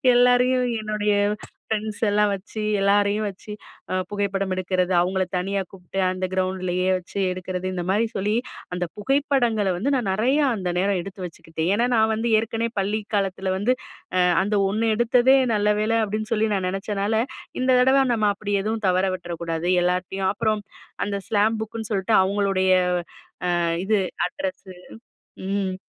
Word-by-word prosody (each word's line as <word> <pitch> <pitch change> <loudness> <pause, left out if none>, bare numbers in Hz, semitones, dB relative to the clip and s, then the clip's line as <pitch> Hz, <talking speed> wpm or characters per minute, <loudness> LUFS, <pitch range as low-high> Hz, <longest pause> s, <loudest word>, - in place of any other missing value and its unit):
எல்லாரையும் 250 +1 +4
என்னுடைய 210 -1 0 0.6
ஃப்ரெண்ட்ஸ் 215 0 -3
எல்லாம் 205 0 +3
வச்சு, 200 +3 -6 0.2
எல்லாரையும் 205 +1 +2
வச்சு 200 +2 -9 0.4
அ - - 0
புகைப்படம் 195 -2 -1
எடுக்கறது, 185 0 0
அவுங்கள 185 +2 +1
தனியா 195 +2 -1
கூப்ட்டு 195 0 -7
அந்த 185 0 -2
கிரவுண்டுலயே 185 -1 -1
வச்சு 185 +2 -10
எடுக்குறது 185 0 -4
இந்த 175 -1 -3
மாரி 215 +4 +2
சொல்லி, 205 +2 0 0.4
அந்த 180 0 -1
புகைப்படங்கள 240 -4 +1
வந்து 260 +10 0
நான் 230 -7 -1
நெறையா 260 +9 +2
அந்த 180 -2 -2
நேரம் 195 0 +1
எடுத்து 195 +1 -9
வச்சுக்கிட்டேன். 165 0 -4
ஏன்னா, 240 +3 +2
நான் 220 0 +3
வந்து 225 +2 -1
ஏற்கனவே 225 +1 -2
பள்ளி 205 +3 0 0.2
காலத்தில 190 -1 -1
வந்து 230 +6 +2 0.4
அ - - +4 0.2
"அந்த 205 +1 -1
1 220 +3 0
எடுத்ததே 250 +3 +4 0.2
நல்ல 210 0 +2
வேலை" 225 +1 +1
அப்டின்னு 215 +2 -4
சொல்லி 220 0 +1
நான் 185 -1 -1
நெனச்சனால, 205 +3 -1 0.4
இந்த 255 - 0
தடவை 270 +1 +5
நம்ம 215 -2 +2
அப்படி 205 0 -4
எதுவும் 220 0 -2
தவற 185 +1 +2
விட்ற 175 -1 -6
கூடாது. 165 +1 -2 0.2
எல்லார்டயும் 185 +2 0
அப்புறம், 215 -1 -1 0.4
அந்த 200 0 -2
ஸ்லாம் 215 +1 +2
புக்குன்னு 220 0 -6
சொல்ட்டு 195 +3 +1
அவங்களுடைய 195 -1 +1 0.9
அ - - 0 0.3
இது, 215 -2 +3 0.3
அட்ரஸு 275 -8 -6 0.8
ம். 195 -2 -1
205 Hz, 150 wpm, -23 LUFS, 190-220 Hz, 0.9 s, தடவை